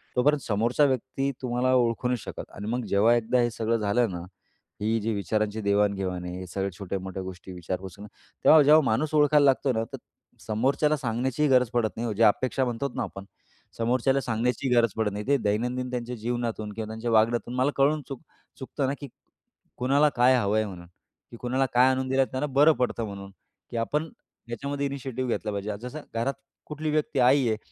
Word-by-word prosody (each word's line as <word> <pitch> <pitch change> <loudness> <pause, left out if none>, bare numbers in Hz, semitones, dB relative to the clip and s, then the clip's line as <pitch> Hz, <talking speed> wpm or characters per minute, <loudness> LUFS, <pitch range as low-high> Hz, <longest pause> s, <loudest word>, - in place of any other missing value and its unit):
तोपर्यंत 145 +3 +3
समोरचा 115 +6 +1
व्यक्ती 135 +1 -1
तुम्हाला 125 +1 0
ओळखू 120 0 +1
नाही 125 0 0
शकत. - - -8
आणि 105 - -6
मग 125 +2 -1
जेव्हा 110 +4 +4
एकदा 120 +2 +1
हे 120 - +2
सगळं 115 +1 0
झालं 110 +2 +1
ना, 85 - -5 0.6
ही 110 +2 +1
जी 110 +2 -1
विचारांची 105 +1 -1
देवाणघेवाण 100 -3 0
आहे. 90 +1 -5
हे 95 - -7
सगळ्या 95 +2 -3
छोट्या-मोठ्या 95 0 -5
गोष्टी 95 0 -9
विचारपूस 90 +1 -6
आहे - - -9
ना. - - -18 0.3
तेव्हा 155 -1 +8
जेव्हा 155 +2 +7
माणूस 145 +8 0
ओळखायला 150 -1 +5
लागतो 135 -1 +3
ना 110 - 0
तर - - -4 0.5
समोरच्याला 135 +7 +1
सांगण्याचीही 130 +3 -1
गरज 125 -2 +4
पडत 115 -2 +1
नाही 120 - -2
ओ, - - -2
जे 115 +3 +1
अपेक्षा 130 +5 +2
म्हणतो 120 +3 -2
ना - - -1
आपण. 100 0 -8 0.5
समोरच्याला 130 +4 +1
सांगण्याची 125 +3 -1
गरज 115 -1 +4
पडत 110 -2 0
नाही 105 +1 -5
ते 140 - +4
दैनंदिन 125 +4 -1
त्यांच्या 125 0 -4
जीवनातून 115 -2 -3
किंवा 110 0 -5
त्यांच्या 110 +2 -4
वागण्यातून 115 +2 +2
मला 130 +3 +2
कळून 145 +3 +3
चुक 135 -3 -7 0.4
चुकतं 135 +1 -3
ना 140 - 0
की 140 - -6 0.7
कुणाला 140 +4 +3
काय 125 +1 +5
हवं 105 -2 +1
आहे 110 - +2
म्हणून? 85 -3 -10 0.4
की 120 - -10
कुणाला 130 +3 0
काय 125 +2 +5
आणून 130 0 -1
दिलं 135 0 +3
त्यांना 130 +3 -2
बरं 150 +3 +6
पडतं 120 -2 0
म्हणून, 100 -1 -8 0.4
की 120 - -4
आपण 150 +7 -1 0.4
याच्यामध्ये 140 +4 -3
इनिशिएटिव्ह 130 -2 -4
घेतला 110 - -2
पाहिजे. 100 +1 -4
जसं 125 +5 -7
घरात 115 +4 -1 0.3
कुठली 155 +1 -4
व्यक्ती 150 -3 0
आई 130 +1 +4
आहे, 110 - 0
120 Hz, 195 wpm, -26 LUFS, 105-135 Hz, 0.7 s, तेव्हा